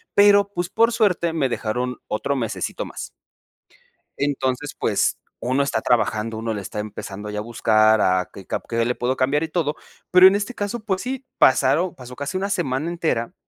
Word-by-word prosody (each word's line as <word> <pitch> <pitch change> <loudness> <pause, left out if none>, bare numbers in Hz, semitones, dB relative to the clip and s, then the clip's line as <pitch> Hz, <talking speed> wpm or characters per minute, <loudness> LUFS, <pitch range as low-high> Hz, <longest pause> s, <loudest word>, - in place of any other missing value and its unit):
Pero 200 0 +6
pues, 175 0 -2
por 230 +3 +3
suerte, 180 -7 +1
me 145 -5 0
dejaron 125 +2 -2
otro 140 +6 -1
mesecito 115 -4 -3
más. - - -7 1.1
Entonces, 140 0 -1
pues, - - +1 0.2
uno 130 +3 +1
está 110 -5 -1
trabajando, 110 -1 0
uno 115 0 -2
le 105 - -4
está 100 - -6
empezando, 105 -1 -6
ya 105 0 -3
a - - -2
buscar 110 -1 +3
a 90 -2 +2
qué 95 - -11
cap - - -3
qué 115 0 +1
le 125 +1 0
puedo 130 +2 -1
cambiar 140 +4 +1
y 160 - -3
todo. 155 -3 -1 0.4
Pero, 180 +1 +9
en 190 - +5
este 205 +4 -2
caso, 205 +3 -3
pues, 190 -3 -1
sí, 265 +1 -5
pasaron 145 +7 +3
pasó 125 -1 -10
casi 145 +7 -3
una 195 +1 -2
semana 160 -5 -1
entera, 160 -9 -1
135 Hz, 185 wpm, -22 LUFS, 115-180 Hz, 1.1 s, Pero